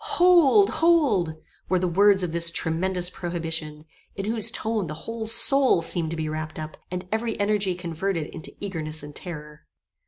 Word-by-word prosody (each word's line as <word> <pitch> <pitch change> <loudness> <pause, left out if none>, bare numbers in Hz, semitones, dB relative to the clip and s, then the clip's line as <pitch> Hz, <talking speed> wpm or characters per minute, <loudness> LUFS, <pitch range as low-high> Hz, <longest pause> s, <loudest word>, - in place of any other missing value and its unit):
"Hold! 360 +2 +5
Hold!" 270 - +2 0.3
were 185 - +2
the 180 0 -1
words 195 +2 +3
of 175 - -3
this 170 0 +2
tremendous 175 +2 -1
prohibition, 165 -3 -5 0.3
in 195 - -5
whose 220 0 +1
tone 220 -4 -3
the 155 - -6
whole 225 -1 -5
soul 245 - +6
seemed 165 -1 +1
to 165 - -4
be 155 -1 -3
wrapped 155 +1 -6
up, 155 0 -7
and 180 0 -6
every 225 0 -2
energy 200 -2 0
converted 170 -1 -4
into 165 0 -7
eagerness 160 -6 -4
and 145 0 -11
terror. 150 -3 -9
180 Hz, 165 wpm, -24 LUFS, 160-215 Hz, 0.3 s, soul